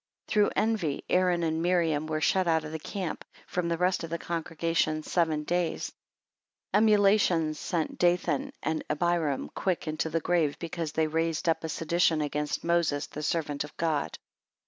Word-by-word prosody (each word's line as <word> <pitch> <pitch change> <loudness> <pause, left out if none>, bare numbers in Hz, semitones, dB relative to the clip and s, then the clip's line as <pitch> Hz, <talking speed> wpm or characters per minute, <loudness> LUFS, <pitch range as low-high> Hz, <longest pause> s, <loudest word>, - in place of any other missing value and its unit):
7 - - -2
Through - - -1
envy 210 -10 0
Aaron 180 -2 +3
and 160 0 0
Miriam 165 -4 +1
were 155 0 -2
shut 185 +4 +2
out 160 -1 +2
of 155 - -7
the 160 - -4
camp, 185 +2 -4 0.2
from 175 -1 -2
the 170 - 0
rest 180 0 +1
of 165 - -5
the 170 - -2
congregation 165 -2 -1
seven 160 -3 +1
days. 175 +1 -1 0.8
8 - - +5
Emulation's 200 -7 +3
sent 165 -3 -2
Dathan 180 +10 +1
and 160 0 -1
Abiram 155 -2 0
quick 180 -4 -1
into 155 +1 -1
the 165 - 0
grave 165 -3 +1
because 165 -2 -4
they 160 - +2
raised 165 +2 -1
up 165 - +2
a 160 - -3
sedition 165 +1 +2
against 150 0 -2
Moses 170 -4 +1
the 150 - -7
servant 150 -2 -1
of 150 - -12
God. 160 -3 -1
165 Hz, 170 wpm, -28 LUFS, 155-175 Hz, 0.8 s, 8